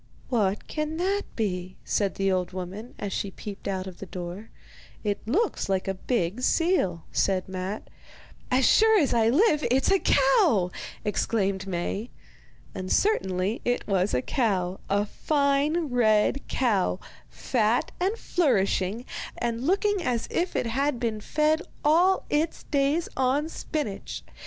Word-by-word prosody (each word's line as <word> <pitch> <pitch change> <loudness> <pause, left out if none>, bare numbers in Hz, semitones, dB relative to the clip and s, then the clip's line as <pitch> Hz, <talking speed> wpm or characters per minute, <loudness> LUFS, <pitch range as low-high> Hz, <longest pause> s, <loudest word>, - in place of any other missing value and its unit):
'What 210 -5 0
can 305 +1 -3
that 390 +4 0
be?' 185 -4 -2
said 200 -2 0
the 195 0 +1
old 185 -1 -1
woman, 190 +6 -7
as 200 -2 -4
she 200 - -2
peeped 200 +1 -8
out 190 -1 -2
of 185 -2 -9
the 195 - -7
door. 180 +4 -7 0.5
'It 205 -2 -1
looks 390 - 0
like 190 -1 0
a 195 - 0
big 195 +1 -1
seal,' 255 - +1
said 190 -2 +1
Matte. 190 +2 -5 0.6
'As 255 0 +3
sure 440 - +6
as 290 - +2
I 225 -1 +4
live, 300 - +3
it's 265 +7 +2
a 390 - +4
cow!' 240 - +3 0.3
exclaimed 200 -2 0
Maie. 195 +5 -3 0.6
And 185 -1 -5
certainly 195 - +1
it 245 0 0
was 190 -4 +1
a 125 - 0
cow, 190 -7 0
a 205 +1 +2
fine 290 +5 +1
red 225 +2 +2
cow, 205 -7 +1 0.3
fat 230 -1 0
and 390 +5 0
flourishing, 220 - +1 0.3
and 235 +2 -2
looking 400 +1 +2
as 245 -8 -1
if 355 +1 -1
it - - 0
had 265 +3 0
been 225 -3 -2
fed 305 +6 +1 0.2
all 350 +5 +4
its 310 +2 -1
days 285 +4 +1
on 265 +4 +1
spinach. 295 -11 -4
230 Hz, 145 wpm, -26 LUFS, 195-295 Hz, 0.6 s, sure